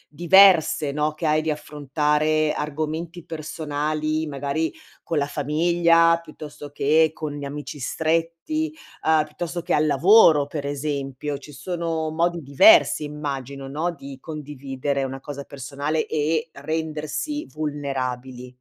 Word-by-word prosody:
diverse, 175 -4 +5
no, 150 +1 0
che 160 +1 -5
hai 155 0 +3
di 160 - -2
affrontare 150 +1 0
argomenti 155 +3 -4
personali, 155 0 -2
magari 145 +3 -2 0.3
con 165 - -3
la 140 - +2
famiglia, 165 +3 +3
piuttosto 150 -2 -10
che 155 +3 +3
con 155 -2 -4
gli 145 -1 -6
amici 145 +1 -7
stretti, 165 - -1 0.4
uhm, 160 -1 +5
piuttosto 170 +3 -5
che 175 - -1
al 155 +1 +3
lavoro, 155 0 +6
per 145 -1 -5
esempio. 140 -1 -3
Ci 150 +1 -12
sono 165 -1 -3
modi 170 0 0
diversi 150 - +6
immagino, 140 -2 -5
no, 155 +5 -2
di 140 -4 -10
condividere 140 -2 -4
una 135 0 -4
cosa 140 0 -7
personale 140 +3 -3
e 155 +1 0
rendersi 160 - -3
vulnerabili. 130 -4 -4
150 Hz, 125 wpm, -23 LUFS, 140-160 Hz, 0.4 s, lavoro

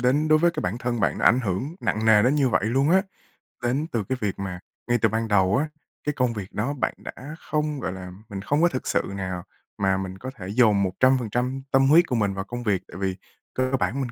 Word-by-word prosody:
đến 140 +5 +2
đối 155 0 +6
với 170 +2 +4
cái - - -4
bản 100 +6 -2
thân 120 -2 -2
bạn 95 - +1
nó - - 0
ảnh 125 - +5
hưởng 125 - -2
nặng 110 +1 -1
nề 110 -2 +6
đến 125 +5 +3
như 140 -3 +3
vậy 105 - +1
luôn 135 +7 +2
á. 190 +2 +5 0.6
Đến 135 +6 0
từ 115 -3 -1
cái 130 - 0
việc 100 -3 -2
mà 95 -2 -4 0.3
ngay 120 - +3
từ - - +4
ban 115 +1 -1
đầu 100 0 +3
á, 150 +3 0 0.3
cái 150 - -1
công 125 -3 +1
việc 100 -4 -7
đó 120 +7 -1
bạn 145 - -1
đã 145 +4 -8
không 150 -1 -2
gọi 105 - -3
là, 90 -1 -8 0.2
mình 100 -1 -5
không 145 +10 +1
có 175 - +6
thực 130 - -4
sự - - +2
nào 95 -2 -4 0.3
mà 95 -1 +2
mình 95 -1 -5
có 130 +6 -6
thể 95 -7 -8
dồn 105 -3 +4
100% 125 +5 +1
tâm 135 0 +4
huyết 165 +4 +6
của 125 - -1
mình 105 -4 +1
vào 95 0 -3
công 120 +2 -6
việc, 100 -5 +1
tại - - -10
vì 95 -1 0 0.4
cơ 130 0 0
bản 90 +2 0
của 140 - -3
mình 125 -3 -3
120 Hz, 260 wpm, -25 LUFS, 100-135 Hz, 0.6 s, đối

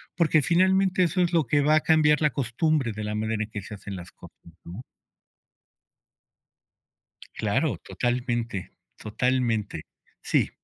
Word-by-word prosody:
porque 160 -2 +3
finalmente 185 +3 +3
eso 180 +2 +1
es 175 0 +1
lo 165 -3 +3
que 145 +4 +2
va 150 +2 +3
a - - +5
cambiar 155 -1 +3
la 150 - +4
costumbre 135 +1 0
de 110 0 -6
la 105 0 -3
manera 110 0 -1
en 105 - -9
que 105 -2 -6
se 100 - -10
hacen 100 0 -8
las 90 -1 -9
cosas, - - -15 0.3
¿no? 90 +9 -9 2.5
Claro, 110 - 0
totalmente. 120 0 -3 0.2
Totalmente. 115 -1 -1 0.4
Sí. - - +1
125 Hz, 140 wpm, -25 LUFS, 110-155 Hz, 2.5 s, a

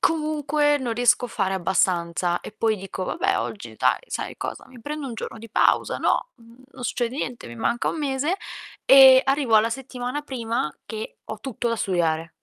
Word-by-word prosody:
comunque 300 -2 +1
non 245 -3 -2
riesco 245 +1 +3
a - - -14
fare 190 -3 -1
abbastanza. 175 -1 +1
E - - -9
poi 220 0 0
dico: 190 -1 -5
"Vabbè! 390 - 0
Oggi - - -5
dai, - - +2
sai - - -5
cosa, - - -6
mi 250 -2 -14
prendo 295 +2 -5
1 240 - -6
giorno 225 - -6
di 230 - -11
pausa, - - +2
no, - - +1
mhmm, 235 +2 -19
non 250 - -10
succede 240 +1 -2
niente, 250 -4 -4
mi 120 - -9
manca 235 - 0
1 - - -3
mese." 290 +5 0 0.5
E, 265 -1 +9
arrivo 270 -4 +3
alla 220 +2 +3
settimana 250 +2 -4
prima 230 - -3
che 220 -1 -7
ho 220 - -7
tutto 240 -2 -3
da 230 - 0
studiare. 165 -4 0
240 Hz, 190 wpm, -24 LUFS, 215-270 Hz, 0.5 s, E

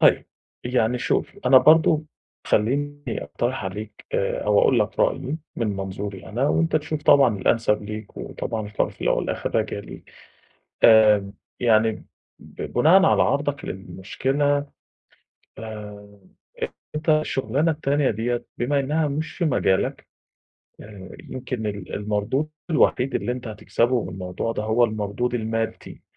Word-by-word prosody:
طيب، - - +4 0.4
يعني 125 -1 +1
شوف، - - -1
أنا 130 +1 +8
برضه 155 +1 +5 0.4
خلّيني 145 +6 0 0.2
أقترِح 120 -2 -3
عليك 105 +3 -7
آآ 485 +1 -1
أو - - +3
أقول 485 - +4
لك - - -1
رأيي - - 0 0.2
من 115 - -1
منظوري 95 0 -5
أنا 125 +6 0
وأنت 165 -1 +2
تشوف 150 0 -3
طبعًا 130 -8 +5
الأنسب 105 +1 +1
ليك، 105 0 -8
وطبعًا 110 -2 -4
القرار 105 0 -1
في - - -20
الأول - - +1
والأخر - - -3
راجع - - 0
ليك. - - -11 0.7
آآ 105 -3 +6 0.3
يعني 110 -2 +2 0.3
ب - - -12
بناءً 175 +9 +4
على - - +4
عرضك 145 +1 -1
للمشكلة 135 +10 -1 0.9
آآ 105 -2 -9 0.7
أنت 155 +2 -5
الشغلانة 150 -1 +1
التانية 145 -2 +1
ديّة 120 +3 -2
بما 140 +4 +1
إنها 150 +3 0
مش 150 +3 -3
في 175 - -2
مجالك، 95 - +1 0.7
آآ 100 -3 -11 0.2
يمكن 125 -3 -4
ال 100 -3 -5
المردود 105 +8 -1 0.2
الوحيد 135 -4 +2
اللي 125 - -1
أنت 125 -1 -6
هتكسبه 115 +3 0
من - - -6
الموضوع 90 +4 -4
ده 105 - -3
هو 110 +3 +3
المردود 110 +2 -2
المادّي. 115 -1 -3
120 Hz, 135 wpm, -23 LUFS, 105-145 Hz, 0.9 s, أنا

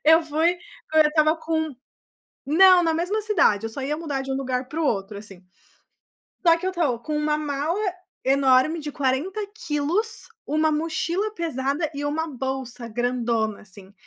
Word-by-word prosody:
eu 320 +2 +6
fui 320 +3 +1 0.4
agora 310 -1 +6
eu - - -1
estava 310 +1 +3
com 315 -2 -2 0.7
Não, 360 +4 +6
na 325 -1 +2
mesma 360 +7 -1
cidade. 345 - +2
Eu - - -3
só 270 - -6
ia 295 +3 -2
mudar 295 -5 -3
de 270 - -5
um - - -1
lugar 255 -1 -2
pro 320 +4 -3
outro, 200 -4 -1
assim. 195 -3 -12 1.0
Só 335 0 +7
que 365 - -4
eu 375 - 0
tô 300 -10 0
com 300 +5 -3
uma 300 0 +1
mala 300 +4 -2 0.5
enorme 270 +3 +3
de 295 -1 -6
40kg, 345 - -2 0.2
uma 310 +2 +1
mochila 330 +6 -1
pesada 305 - -2
e 285 +1 -4
uma 310 +3 -1
bolsa 260 -3 -5
grandona, 235 -2 -1
assim. 195 -1 -15
300 Hz, 160 wpm, -24 LUFS, 260-330 Hz, 1.0 s, Só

